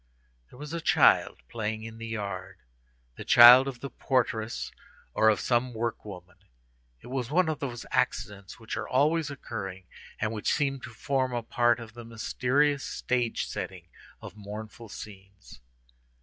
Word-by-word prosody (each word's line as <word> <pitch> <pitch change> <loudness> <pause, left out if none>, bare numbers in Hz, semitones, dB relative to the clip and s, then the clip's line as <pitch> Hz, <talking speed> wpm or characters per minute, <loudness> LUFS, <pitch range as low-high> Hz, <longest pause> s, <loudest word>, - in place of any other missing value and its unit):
There - - -16
was 150 +3 -8
a 170 - -3
child - - +3
playing 110 -1 -4
in 115 0 -9
the 115 - -6
yard—the - - -8
child 125 +3 +9
of 125 -3 -6
the 140 - -6
portress 115 -4 -1 0.4
or 110 - +4
of 110 - +2
some 120 0 0
work 115 0 -3
woman. 90 -3 -11 0.6
It - - -13
was 125 -2 -3
one 175 +3 +3
of 155 -2 -2
those 125 -5 -5
accidents 100 -1 -2
which 110 - -6
are - - -4
always 150 +4 +2
occurring, 95 -9 -6 0.4
and 110 0 -1
which 110 -2 -1
seem 135 -2 0
to 120 - -9
form 130 +2 -1
a 120 -1 -2
part 120 +1 +2
of 115 -2 -10
the 120 0 -10
mysterious 130 +5 0
stage 125 -2 -1
setting - - -7 0.3
of - - -9
mournful 105 +2 -9
scenes. 95 - -12
115 Hz, 155 wpm, -28 LUFS, 105-130 Hz, 0.6 s, child